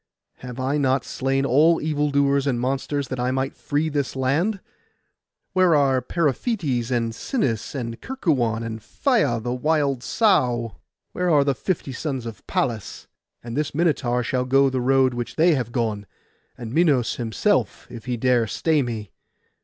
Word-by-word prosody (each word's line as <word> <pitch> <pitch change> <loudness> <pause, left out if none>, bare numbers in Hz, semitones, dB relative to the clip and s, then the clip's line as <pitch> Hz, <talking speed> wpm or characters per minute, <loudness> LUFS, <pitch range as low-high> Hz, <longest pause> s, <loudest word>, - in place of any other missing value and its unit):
Have 125 0 -8
I 135 +3 0
not 135 -1 +1
slain 135 +1 -1
all 155 +6 +4
evil 150 -1 0
doers 140 0 +2
and 125 -3 0
monsters, 135 +2 -2
that 130 - -4
I 125 +1 0
might 130 +1 -1
free 150 +2 -1
this 145 -4 -2
land? 155 +11 0 0.9
Where 185 -3 +4
are 135 -3 +3
Periphetes, 150 - -1
and 115 -2 0
Sinis, 115 - -2
and 115 -3 -5
Kerkuon, 130 - 0
and 115 -1 -5
Phaia 120 - +1
the 120 +2 -3
wild 140 -1 0
sow? 120 - +1 0.3
Where 180 0 -1
are 150 -4 +5
the 140 0 +1
fifty 150 0 -3
sons 130 -2 -4
of 115 -2 -8
Pallas? 115 -5 -2 0.4
And 115 0 -6
this 150 0 -2
Minotaur 140 -7 +1
shall 125 +1 -1
go 135 +1 +3
the 130 -1 -1
road 130 0 +3
which 120 -1 -5
they 165 +2 +4
have 125 -5 -2
gone, 110 -4 -2 0.5
and 115 -1 -7
Minos 145 -7 +2
himself, 115 -3 0
if 115 -2 -9
he 125 -2 -2
dare 120 -1 +2
stay 155 - +1
me. 110 -6 -5
130 Hz, 160 wpm, -23 LUFS, 120-150 Hz, 0.9 s, are